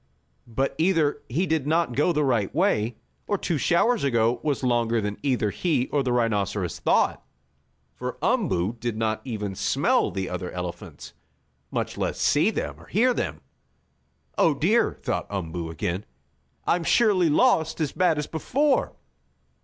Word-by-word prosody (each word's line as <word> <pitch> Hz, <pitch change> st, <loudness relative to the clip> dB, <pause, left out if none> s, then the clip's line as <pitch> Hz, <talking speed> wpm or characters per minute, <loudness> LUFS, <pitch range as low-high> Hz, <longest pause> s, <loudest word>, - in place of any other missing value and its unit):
But 130 Hz, +4 st, -1 dB
either 160 Hz, -4 st, +2 dB
he 160 Hz, +10 st, 0 dB
did 160 Hz, -5 st, -1 dB
not 160 Hz, -4 st, +1 dB
go 150 Hz, +5 st, +3 dB
the 150 Hz, -2 st, +1 dB
right 120 Hz, -8 st, +1 dB
way, 120 Hz, -, +1 dB, 0.3 s
or 205 Hz, -, +1 dB
two 165 Hz, -5 st, -1 dB
showers 220 Hz, -, +2 dB
ago 120 Hz, -3 st, +2 dB
was 145 Hz, -3 st, -1 dB
longer 120 Hz, -2 st, +2 dB
than 105 Hz, -1 st, -3 dB
either 125 Hz, -7 st, 0 dB
he 125 Hz, -, 0 dB
or 145 Hz, -, +1 dB
the 130 Hz, -2 st, -1 dB
rhinoceros 100 Hz, -6 st, 0 dB
thought, -, -, +2 dB, 0.7 s
for -, -, -5 dB
Umboo 95 Hz, +7 st, +1 dB
did 120 Hz, -2 st, -3 dB
not 110 Hz, -1 st, -1 dB
even 105 Hz, -6 st, -4 dB
smell -, -, +1 dB
the 95 Hz, -1 st, -3 dB
other 90 Hz, 0 st, -4 dB
elephants, 90 Hz, -1 st, -7 dB, 0.6 s
much -, -, -3 dB
less -, -, -2 dB
see 150 Hz, +8 st, +3 dB
them 220 Hz, -, -4 dB
or -, -, -16 dB
hear 245 Hz, +5 st, +3 dB
them. -, -, -3 dB, 1.0 s
"Oh, 160 Hz, -, +4 dB
dear!" 210 Hz, +11 st, +2 dB
thought -, -, -2 dB
Umboo 85 Hz, -4 st, -4 dB
again. 85 Hz, +4 st, -3 dB, 0.6 s
"I'm 175 Hz, 0 st, +1 dB
surely 190 Hz, -4 st, +3 dB
lost 160 Hz, -3 st, +3 dB
as 155 Hz, -3 st, 0 dB
bad 180 Hz, -4 st, +2 dB
as 150 Hz, -, -1 dB
before! 270 Hz, -, 0 dB
135 Hz, 155 wpm, -25 LUFS, 105-165 Hz, 1.0 s, Oh